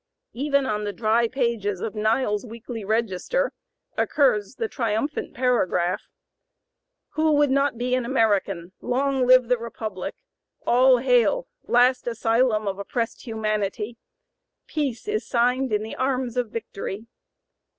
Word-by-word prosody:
Even 280 Hz, +1 st, +1 dB
on 210 Hz, -5 st, -1 dB
the 205 Hz, -, -2 dB
dry 225 Hz, +3 st, +2 dB
pages 230 Hz, -6 st, -1 dB
of 215 Hz, -, -4 dB
Niles's 215 Hz, 0 st, +1 dB
"Weekly 230 Hz, -1 st, -7 dB
Register" 225 Hz, -, 0 dB, 0.4 s
occurs 250 Hz, -6 st, +2 dB
the 455 Hz, -, -2 dB
triumphant 235 Hz, -, -2 dB
paragraph: 185 Hz, -8 st, +1 dB, 1.1 s
"Who 315 Hz, 0 st, +1 dB
would 290 Hz, -2 st, +3 dB
not 275 Hz, -2 st, +2 dB
be 250 Hz, +1 st, -1 dB
an 255 Hz, -1 st, +2 dB
American? 205 Hz, -8 st, +1 dB
Long 265 Hz, 0 st, 0 dB
live 255 Hz, -1 st, +6 dB
the 250 Hz, -1 st, +2 dB
Republic! 220 Hz, -4 st, -5 dB, 0.5 s
All 255 Hz, +1 st, +5 dB
hail! 250 Hz, -, +2 dB, 0.2 s
last 250 Hz, +1 st, +3 dB
asylum 230 Hz, -1 st, +2 dB
(p. -, -, -7 dB
097) -, -, -4 dB
of 195 Hz, 0 st, -5 dB
oppressed 230 Hz, +3 st, -3 dB
humanity! 215 Hz, 0 st, -2 dB, 0.7 s
Peace 285 Hz, -, -3 dB
is 430 Hz, 0 st, -2 dB
signed 250 Hz, +1 st, +1 dB
in 210 Hz, 0 st, +1 dB
the 220 Hz, -, -6 dB
arms 255 Hz, -2 st, -1 dB
of 245 Hz, -3 st, -1 dB
victory!" 210 Hz, -1 st, -6 dB
235 Hz, 135 wpm, -24 LUFS, 215-260 Hz, 1.1 s, live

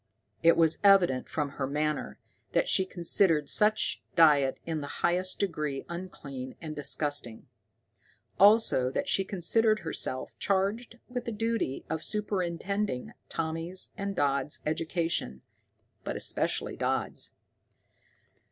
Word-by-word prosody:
It 165 Hz, 0 st, +5 dB
was 165 Hz, -1 st, +4 dB
evident 185 Hz, -10 st, +5 dB
from 150 Hz, -2 st, -2 dB
her 140 Hz, -1 st, -4 dB
manner 150 Hz, +1 st, -2 dB, 0.4 s
that -, -, +2 dB
she 190 Hz, -, +2 dB
considered 170 Hz, -4 st, +3 dB
such 215 Hz, +5 st, +2 dB
diet 145 Hz, -5 st, +5 dB
in 160 Hz, -2 st, -2 dB
the 145 Hz, -, -7 dB
highest 180 Hz, +2 st, +1 dB
degree 150 Hz, -8 st, -2 dB
unclean 140 Hz, -7 st, -7 dB
and 155 Hz, -2 st, -6 dB
disgusting; 145 Hz, -5 st, -2 dB, 0.9 s
also 200 Hz, -, +5 dB
that -, -, -2 dB
she 195 Hz, -, +2 dB
considered 215 Hz, +4 st, +2 dB
herself 130 Hz, -5 st, -4 dB
charged 205 Hz, +5 st, -1 dB
with 245 Hz, -1 st, -5 dB
the 235 Hz, -, -3 dB
duty 225 Hz, -9 st, -2 dB
of 160 Hz, 0 st, -3 dB
superintending 200 Hz, -5 st, -2 dB, 0.2 s
Tommy's 165 Hz, +3 st, -3 dB
and 200 Hz, 0 st, -4 dB
Dodd's 140 Hz, -1 st, 0 dB
education, 160 Hz, -, -2 dB, 0.6 s
but -, -, -4 dB
especially -, -, -1 dB
Dodd's. -, -, -2 dB
165 Hz, 115 wpm, -29 LUFS, 145-200 Hz, 0.9 s, It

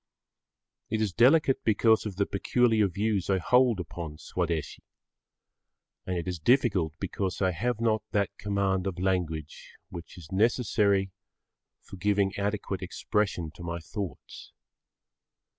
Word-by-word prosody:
It 110 Hz, -, -1 dB
is 105 Hz, -4 st, 0 dB
delicate 135 Hz, -, +4 dB
because 110 Hz, 0 st, +3 dB
of 100 Hz, -, -6 dB
the 100 Hz, +2 st, +1 dB
peculiar 110 Hz, +1 st, +2 dB
views 100 Hz, +1 st, -1 dB
I 95 Hz, -, +3 dB
hold 125 Hz, +3 st, +3 dB
upon 80 Hz, -3 st, -6 dB
Swadeshi, 85 Hz, -1 st, -3 dB, 1.3 s
and 90 Hz, -1 st, -1 dB
it 85 Hz, -, -4 dB
is 90 Hz, -2 st, -3 dB
difficult 95 Hz, -, +2 dB
because 95 Hz, -1 st, -3 dB
I 95 Hz, -1 st, +2 dB
have 120 Hz, +6 st, -2 dB
not 110 Hz, -2 st, +1 dB
that 100 Hz, -1 st, 0 dB
command 100 Hz, -2 st, 0 dB
of 95 Hz, -2 st, -4 dB
language 85 Hz, -5 st, -2 dB
which 85 Hz, +1 st, -9 dB
is 80 Hz, -4 st, -12 dB
necessary 100 Hz, -2 st, +2 dB, 0.7 s
for 95 Hz, -, -11 dB
giving 100 Hz, +1 st, +1 dB
adequate 100 Hz, -1 st, -2 dB
expression 95 Hz, -3 st, -1 dB
to 85 Hz, -, -14 dB
my 85 Hz, 0 st, -3 dB
thoughts. 85 Hz, -1 st, -7 dB
100 Hz, 130 wpm, -28 LUFS, 90-110 Hz, 1.3 s, delicate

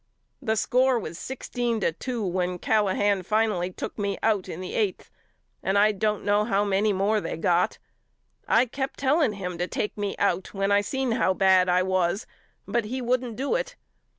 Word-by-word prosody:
The 220 Hz, -, 0 dB
score 255 Hz, +3 st, +2 dB
was 170 Hz, -7 st, -6 dB
sixteen 240 Hz, -3 st, -3 dB
to 170 Hz, -, +2 dB
two 230 Hz, +6 st, -4 dB
when 180 Hz, 0 st, -1 dB
Callahan 205 Hz, -1 st, +1 dB
finally 210 Hz, -2 st, 0 dB
took 185 Hz, -, -6 dB
me 200 Hz, -1 st, -1 dB
out 205 Hz, -4 st, +1 dB
in 165 Hz, -, -6 dB
the 185 Hz, -, -6 dB
eighth 205 Hz, -4 st, -1 dB, 0.5 s
and 195 Hz, +1 st, +1 dB
I 210 Hz, +1 st, +5 dB
don't 210 Hz, 0 st, -1 dB
know 205 Hz, +1 st, +3 dB
how 205 Hz, -2 st, +1 dB
many 205 Hz, +1 st, +2 dB
more 205 Hz, +2 st, +1 dB
they -, -, -4 dB
got. 175 Hz, +2 st, +1 dB, 0.7 s
I 235 Hz, +3 st, +4 dB
kept 265 Hz, +2 st, -4 dB
telling 280 Hz, -3 st, +2 dB
him 180 Hz, -3 st, -5 dB
to 175 Hz, -, 0 dB
take 210 Hz, -, -3 dB
me 205 Hz, -1 st, -3 dB
out 190 Hz, -1 st, 0 dB
when 195 Hz, +1 st, 0 dB
I 200 Hz, 0 st, +5 dB
seen 265 Hz, +4 st, -2 dB
how 220 Hz, -5 st, +2 dB
bad 185 Hz, -1 st, +4 dB
I 180 Hz, +1 st, +3 dB
was 185 Hz, +2 st, 0 dB, 0.4 s
but 230 Hz, +2 st, 0 dB
he 255 Hz, +5 st, -3 dB
wouldn't 250 Hz, -1 st, -1 dB
do 270 Hz, -, -1 dB
it. -, -, -2 dB
205 Hz, 185 wpm, -26 LUFS, 185-235 Hz, 0.7 s, I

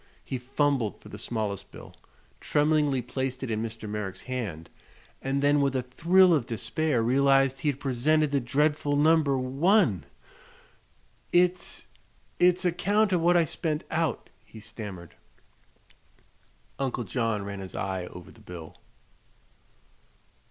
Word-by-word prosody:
He 130 Hz, -, -4 dB
fumbled 135 Hz, -3 st, 0 dB
for -, -, -14 dB
the 105 Hz, -, -9 dB
smallest 105 Hz, -4 st, -3 dB
bill, -, -, -13 dB, 0.4 s
tremblingly 150 Hz, -3 st, +2 dB
placed 130 Hz, +1 st, -3 dB
it 125 Hz, -, -3 dB
in 110 Hz, 0 st, -1 dB
Mr. 110 Hz, -1 st, -6 dB
Merrick's 105 Hz, -3 st, -5 dB
hand, 110 Hz, -11 st, -5 dB, 0.5 s
and 135 Hz, +1 st, -1 dB
then 145 Hz, 0 st, +4 dB
with 140 Hz, -1 st, +1 dB
a 130 Hz, -, 0 dB
thrill 175 Hz, +8 st, +4 dB
of 140 Hz, -8 st, +1 dB
despair 120 Hz, +3 st, -1 dB
realized 135 Hz, +2 st, +3 dB
he 150 Hz, -, -3 dB
had 140 Hz, -1 st, -3 dB
presented 145 Hz, +4 st, +1 dB
the 140 Hz, -, +2 dB
dreadful 145 Hz, +3 st, +1 dB
No. 155 Hz, +3 st, +5 dB, 0.2 s
1! 130 Hz, -, +2 dB, 1.3 s
"It's 180 Hz, +1 st, +1 dB, 0.5 s
it's 180 Hz, +1 st, +4 dB
a 180 Hz, -, +4 dB
'count 205 Hz, +4 st, +1 dB
of 175 Hz, -, +2 dB
what 175 Hz, +1 st, +4 dB
I 170 Hz, -, +4 dB
spent 155 Hz, 0 st, -2 dB
out," 160 Hz, -1 st, -1 dB
he 110 Hz, -, -13 dB
stammered. 105 Hz, -5 st, -8 dB, 1.7 s
Uncle 130 Hz, -3 st, -1 dB
John 115 Hz, -1 st, -1 dB
ran 100 Hz, 0 st, -6 dB
his 95 Hz, -1 st, -8 dB
eye 95 Hz, -2 st, -3 dB
over 90 Hz, -1 st, -11 dB
the -, -, -18 dB
bill. 85 Hz, -3 st, -10 dB
135 Hz, 140 wpm, -27 LUFS, 110-155 Hz, 1.7 s, No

